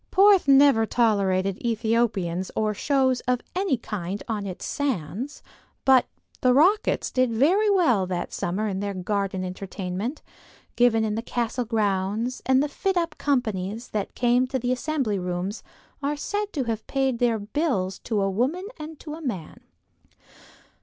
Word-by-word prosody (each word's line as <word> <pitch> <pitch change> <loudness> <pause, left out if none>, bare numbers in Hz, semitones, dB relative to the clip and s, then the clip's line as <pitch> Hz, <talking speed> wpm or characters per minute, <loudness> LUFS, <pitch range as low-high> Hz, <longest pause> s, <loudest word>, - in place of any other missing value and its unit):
Porth 390 -3 +5
never 275 -5 +6
tolerated 195 -5 +1
Ethiopians 220 -6 0
or 215 -1 +1
shows 260 +2 +1
of 250 -1 +1
any 370 -8 +1
kind 200 -4 -5
on 210 -3 -3
its 185 - -6
sands, 250 - -3 0.4
but 265 -1 +5 0.3
"The 250 -1 +4
Rockets" 380 +10 +3
did 255 -1 +2
very 350 - +3
well 255 - +3
during 180 -1 -2
that - - -6
summer 195 +5 -2
in 190 -2 -2
their 200 0 -3
garden 195 0 -2
entertainment, 190 - -5 0.5
given 240 -2 +4
in 215 -1 0
the 225 - -2
castle 240 +1 -2
grounds, 215 +2 -1
and 265 +1 +4
the - - 0
fit 380 +6 -1
up 335 -3 0
companies 225 -5 -1
that 210 -2 -3
came 245 +1 +3
to 260 +1 -1
the 250 0 -1
Assembly 255 -6 -1
Rooms 180 +3 -3 0.4
are 290 +1 -1
said 410 +7 -3
to 280 - -1
have 225 -2 -4
paid 265 -3 0
their 235 -2 +2
bills 205 - -1
to 215 -4 -1
a 195 - 0
woman 270 - -1
and 310 0 -8
to 300 - -7
a 320 - -8
man. 200 - -5
235 Hz, 160 wpm, -25 LUFS, 200-275 Hz, 0.5 s, never